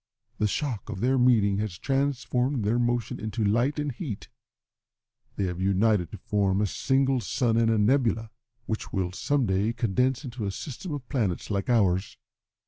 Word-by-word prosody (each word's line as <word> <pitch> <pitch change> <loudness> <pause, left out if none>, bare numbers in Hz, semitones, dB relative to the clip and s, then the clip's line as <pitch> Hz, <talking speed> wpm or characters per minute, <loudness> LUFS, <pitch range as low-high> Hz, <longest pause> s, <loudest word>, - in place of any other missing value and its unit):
The 105 - +3
shock 115 -2 -3
of - - -5
their 130 +4 +2
meeting 110 -6 +4
has 105 -4 -3
transformed 135 -2 0
their 115 +4 +2
motion 120 -1 0
into 110 +1 -2
light 120 +8 +2
and 145 -1 -1
heat. 120 - -6 1.1
They - - -1
have 90 -1 -2
united 100 -2 +2
to - - -8
form 100 0 0
a 105 - +2
single 135 +5 +1
sun 120 -1 0
and 115 0 +3
a 115 - +3
nebula, 115 0 +2 0.3
which 110 -1 -4
will 95 -3 -1
some 140 +7 0
day 100 +3 +1
condense 125 +5 0
into 120 -4 -4
a - - -1
system 145 - -6
of 140 -4 -5
planets 110 - -1
like 100 +1 -1
ours. 100 -5 +2
115 Hz, 170 wpm, -27 LUFS, 100-130 Hz, 1.1 s, meeting